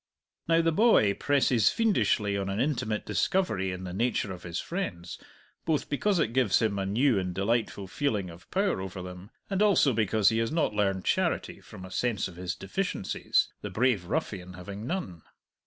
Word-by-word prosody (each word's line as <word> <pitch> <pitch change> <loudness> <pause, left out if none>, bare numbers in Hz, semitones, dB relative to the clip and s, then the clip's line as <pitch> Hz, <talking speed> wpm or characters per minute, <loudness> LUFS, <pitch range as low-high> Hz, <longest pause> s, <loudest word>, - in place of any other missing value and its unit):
Now 165 0 +4
the 165 - +3
boy 160 - +4
presses 130 -5 +3
fiendishly 110 - +1
on 100 0 -2
an 100 +2 -2
intimate 125 -7 -1
discovery 110 - 0
in 90 0 -6
the 90 -1 -6
nature 110 -1 0
of 90 - -10
his 85 -1 -4
friends, 90 - -5 0.4
both 160 -3 -1
because 195 +7 +1
it 115 -8 0
gives 125 -6 +3
him 105 -3 0
a 95 - -2
new 115 +2 +2
and 90 -1 -3
delightful 100 0 0
feeling 105 - -2
of 85 +1 -15
power 195 - 0
over 95 -1 -6
them, 90 +2 -9 0.2
and 195 0 -1
also 195 -10 +4
because 110 -1 +3
he 110 0 0
has 115 0 0
not 160 -8 +1
learned 95 -3 0
charity - - 0
from 95 - -11
a 95 - -11
sense 115 -5 0
of 90 - -12
his 90 -1 -4
deficiencies, 95 - -1
the - - -5
brave 120 -6 +1
ruffian 95 - -3
having 100 +5 -7
none. 165 - -4
105 Hz, 185 wpm, -28 LUFS, 95-145 Hz, 0.4 s, Now